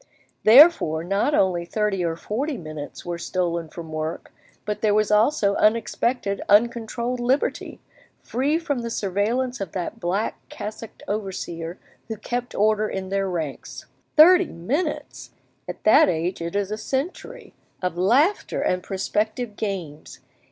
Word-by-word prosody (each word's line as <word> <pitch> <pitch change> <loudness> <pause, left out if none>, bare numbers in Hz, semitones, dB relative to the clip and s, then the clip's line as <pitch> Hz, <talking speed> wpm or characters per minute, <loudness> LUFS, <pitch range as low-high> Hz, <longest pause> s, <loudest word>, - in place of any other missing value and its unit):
Therefore 225 - +6
not 200 - +1
only 180 -3 +2
thirty 195 +1 -1
or 165 -1 -1
forty 260 - -3
minutes 155 -5 -8
were 175 -1 -4
stolen 170 -3 -2
from 160 0 -9
work, 155 +1 -5 0.3
but 210 0 -3
there 210 -2 +3
was 215 0 +2
also 210 -1 +3
unexpected, 225 -1 +1
uncontrolled 235 +3 +2
liberty, 255 +4 -1 0.4
free 280 +6 0
from 310 -6 -2
the 235 -1 -4
surveillance 225 +5 -1
of 190 -5 -5
that 195 +5 -4
black 195 +3 -2
cassocked 215 +1 -8
overseer 180 -5 -4 0.3
who 220 - -5
kept 245 +3 -4
order 215 +1 +2
in 190 -1 -4
their 195 0 0
ranks. 160 -6 -5 0.3
Thirty 355 +3 +7
minutes! 285 - -3 0.3
at - - -7
that 215 - +6
age 170 +1 -2
it 170 +3 -4
is 200 0 -1
a 215 - -3
century, 270 - -4 0.3
of 180 -2 -1
laughter 260 - +2
and 180 0 0
prospective 210 +4 -2
games! 180 -9 -5
210 Hz, 135 wpm, -23 LUFS, 180-240 Hz, 0.4 s, Thirty